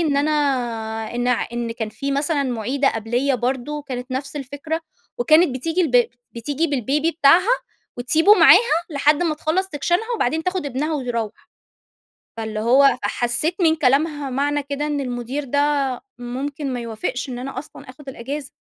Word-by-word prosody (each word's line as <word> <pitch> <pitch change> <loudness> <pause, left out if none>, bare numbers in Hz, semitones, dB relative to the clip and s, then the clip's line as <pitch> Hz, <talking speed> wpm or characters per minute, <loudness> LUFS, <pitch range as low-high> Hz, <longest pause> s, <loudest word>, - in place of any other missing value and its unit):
إن 300 -4 +1
أنا 295 +2 +2 0.8
إن 245 +1 0
ع 250 - +1
إن 240 -1 -3
كان 225 -2 -4
في 275 +6 -4
مثلًا 285 +1 +1
مُعيدة 260 +2 0
قَبليّا 240 +5 0
برضه 260 +4 -2
كانت 255 -2 -6
نفس 275 +3 -4
الفكرة 285 +4 -4 0.4
وكانت 310 +3 +4
بتيجي 325 +8 -1
الب 250 -7 +3 0.2
بتيجي 285 +7 -2
بالبيبي 285 +3 0
بتاعها 335 +6 +4 0.5
وتسيبه 320 +11 +5
معاها 355 0 +6
لحد 300 +3 +2
ما 320 -3 +1
تخلّص 325 +5 -1
سكشنها 350 - -1
وبعدين 315 - 0
تاخُد 365 -4 -2
ابنها 285 +4 -2
وتروّح. 240 -6 -4 0.9
فاللي 220 -1 -4
هو 255 +4 +4
فحسّيت 300 +8 0
من 320 -1 +4
كلامها 290 0 +1
معنى 285 +2 0
كده 285 +1 -3
إن 290 -1 -1
المٌدير 250 +2 -4
ده 285 +2 -1 0.6
ممكن 265 +3 -4
ما 245 - -3
يوافقش 235 +3 -4
إن 245 -1 -5
أنا 260 0 -5
أصلًا 280 - -12
آخُد 270 +1 -11
الأجازة. 270 +3 -6
280 Hz, 155 wpm, -21 LUFS, 245-305 Hz, 0.9 s, معاها